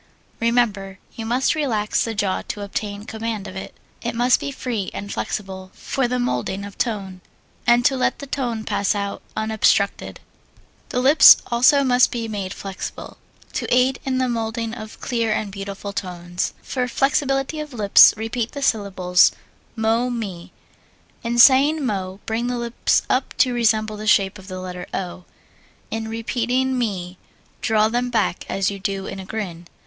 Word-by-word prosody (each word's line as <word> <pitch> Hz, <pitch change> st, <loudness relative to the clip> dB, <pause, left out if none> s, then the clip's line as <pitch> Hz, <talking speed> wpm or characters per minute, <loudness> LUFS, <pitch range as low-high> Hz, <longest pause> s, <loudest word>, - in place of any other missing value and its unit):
Remember, 215 Hz, -5 st, 0 dB, 0.2 s
you 225 Hz, -1 st, -6 dB
must 250 Hz, +3 st, +2 dB
relax 230 Hz, -9 st, 0 dB
the 225 Hz, -1 st, -3 dB
jaw 200 Hz, -2 st, 0 dB
to 205 Hz, -, -5 dB
obtain 205 Hz, 0 st, -4 dB
command 220 Hz, -2 st, -4 dB
of 185 Hz, -, -9 dB
it. 190 Hz, -, -7 dB, 0.3 s
It 235 Hz, 0 st, -3 dB
must 245 Hz, +2 st, +3 dB
be -, -, -4 dB
free 235 Hz, -7 st, -3 dB
and 200 Hz, 0 st, -5 dB
flexible 190 Hz, -2 st, -4 dB
for 265 Hz, -2 st, -1 dB
the 250 Hz, +1 st, -1 dB
moulding 200 Hz, -, -2 dB
of 200 Hz, -, -10 dB
tone, 195 Hz, -6 st, -3 dB, 0.5 s
and 240 Hz, 0 st, +4 dB
to 270 Hz, -, +4 dB
let 255 Hz, -, 0 dB
the 280 Hz, -, -8 dB
tone 245 Hz, -5 st, -3 dB
pass 205 Hz, -2 st, 0 dB
out 200 Hz, -1 st, -3 dB, 0.2 s
unobstructed. 220 Hz, -2 st, +1 dB, 0.7 s
The 250 Hz, -, -1 dB
lips 280 Hz, +5 st, +9 dB
also 250 Hz, +4 st, +5 dB
must 250 Hz, -1 st, +4 dB
be 230 Hz, -2 st, -3 dB
made 200 Hz, -4 st, -4 dB
flexible, 195 Hz, -1 st, -7 dB, 0.3 s
to -, -, -3 dB
aid 255 Hz, +1 st, +3 dB
in 260 Hz, -1 st, -1 dB
the 255 Hz, 0 st, +1 dB
moulding 230 Hz, -1 st, -2 dB
of 220 Hz, -2 st, -9 dB
clear 230 Hz, -3 st, -1 dB
and 215 Hz, -1 st, -1 dB
beautiful 200 Hz, 0 st, -6 dB
tones. 175 Hz, -2 st, -4 dB
For 250 Hz, -2 st, -2 dB
flexibility 270 Hz, +3 st, 0 dB
of 300 Hz, -1 st, -6 dB
lips 210 Hz, -5 st, +7 dB
repeat 225 Hz, +1 st, -3 dB
the 280 Hz, -1 st, -5 dB
syllables, 190 Hz, -6 st, +3 dB, 0.4 s
mo 225 Hz, +2 st, +1 dB
me. 195 Hz, -7 st, -5 dB, 0.7 s
In 235 Hz, 0 st, -2 dB
saying 280 Hz, +4 st, +6 dB
mo, 190 Hz, -4 st, -3 dB
bring 230 Hz, +2 st, -1 dB
the 245 Hz, 0 st, -2 dB
lips 235 Hz, 0 st, +1 dB
up 255 Hz, 0 st, -1 dB
to 255 Hz, -, +3 dB
resemble 215 Hz, -2 st, +1 dB
the 215 Hz, +1 st, -6 dB
shape 195 Hz, -1 st, +3 dB
of 190 Hz, -, -14 dB
the 185 Hz, -1 st, -6 dB
letter 180 Hz, -1 st, -7 dB
O. 180 Hz, -1 st, -5 dB, 0.7 s
In 225 Hz, 0 st, -3 dB
repeating 245 Hz, +3 st, -1 dB
me 190 Hz, -7 st, -3 dB, 0.4 s
draw 215 Hz, -2 st, +3 dB
them 245 Hz, +2 st, -1 dB
back 225 Hz, -6 st, 0 dB
as 195 Hz, 0 st, 0 dB
you 200 Hz, -, -7 dB
do 195 Hz, 0 st, -3 dB
in 195 Hz, -, -6 dB
a 190 Hz, -, -7 dB
grin. 180 Hz, -5 st, -6 dB
220 Hz, 165 wpm, -22 LUFS, 195-245 Hz, 0.7 s, lips